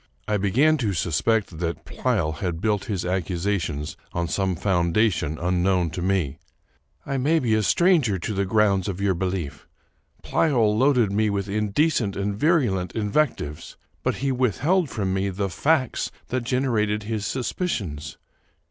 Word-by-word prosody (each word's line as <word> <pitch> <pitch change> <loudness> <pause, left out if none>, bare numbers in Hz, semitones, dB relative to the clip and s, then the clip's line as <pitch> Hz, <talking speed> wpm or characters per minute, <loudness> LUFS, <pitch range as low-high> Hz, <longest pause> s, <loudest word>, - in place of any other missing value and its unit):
I 105 -1 +1
began 130 +11 +3
to 110 -8 -1
suspect 90 +2 0
that 85 -1 -3
Pleyel 80 0 -1
had 90 -4 -2
built 105 +4 0
his 100 -8 -3
accusations 90 -4 -2 0.2
on 85 0 -1
some 95 +1 0
foundation 85 -2 +1
unknown 90 0 +1
to 90 - -5
me. 90 -6 0 0.3
'' - - -42
1 135 -2 -2
may 155 +5 +3
be 120 -7 +1
a 110 - +3
stranger 125 - +3
to 95 +5 -4
the 100 0 0
grounds 100 -2 +2
of 95 -2 -3
your 100 -1 +2
belief. 90 -5 -4 0.6
Pleyel 120 -9 +2
loaded 125 -4 +3
me 105 +2 +2
with 100 -1 -2
in 105 +1 -1
decent 115 -4 +1
and 100 0 -2
virulent 115 - +1
invectives, 105 - -1 0.2
but - - 0
he 135 - +2
withheld 140 - +1
from 95 -3 -2
me 95 +1 0
the 100 +1 -2
facts 140 - +1 0.2
that 125 -1 -2
generated 115 -5 0
his 105 -2 -3
suspicions. 100 - -3
100 Hz, 155 wpm, -24 LUFS, 90-120 Hz, 0.6 s, began